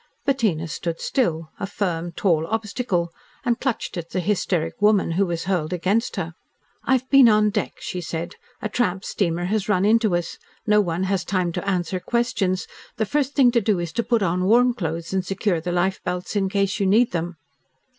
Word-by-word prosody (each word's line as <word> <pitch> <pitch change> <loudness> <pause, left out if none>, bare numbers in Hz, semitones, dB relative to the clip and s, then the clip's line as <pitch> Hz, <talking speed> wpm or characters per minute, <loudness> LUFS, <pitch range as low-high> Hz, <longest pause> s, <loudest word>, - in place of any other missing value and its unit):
Bettina 215 - +1
stood 165 +1 -4
still, 165 - -1
a 200 - -3
firm, 175 -4 -2
tall 165 -3 +1
obstacle, 210 -5 -1 0.3
and 240 -1 +1
clutched 265 -6 -2
at 170 -1 -5
the 185 - -2
hysteric 180 -3 -1
woman 210 -4 +4
who 190 +4 +1
was 170 -1 -2
hurled 175 -4 -1
against 195 +7 0
her. 165 +1 -3 0.5
"I've 260 -1 +1
been 275 -4 +8
on 210 -1 +4
deck," 210 -1 -2
she 180 - -5
said. 170 +1 -4 0.3
"A - - +1
tramp 195 -3 -1
steamer 175 -3 -1
has 210 +2 -1
run 190 -2 +3
into 220 -3 +3
us. 175 -1 -3 0.3
No 210 -1 +4
one 175 -1 -1
has 190 -1 0
time 185 -2 0
to 200 - -3
answer 185 -1 -1
questions. 200 -4 0 0.3
The 220 - +1
first 285 +3 -1
thing 255 -4 +5
to 235 -1 +2
do 210 -1 +1
is 170 -2 -4
to 235 - +1
put 235 -2 +1
on 180 0 0
warm 245 +4 +5
clothes 170 -5 -4
and 190 -1 +1
secure 190 -2 -1
the 175 +2 -3
life 185 +2 0
belts 180 +3 -3
in 195 -2 +1
case 200 0 0
you 200 - +2
need 225 +5 +4
them." 170 0 -3
190 Hz, 195 wpm, -23 LUFS, 175-215 Hz, 0.5 s, been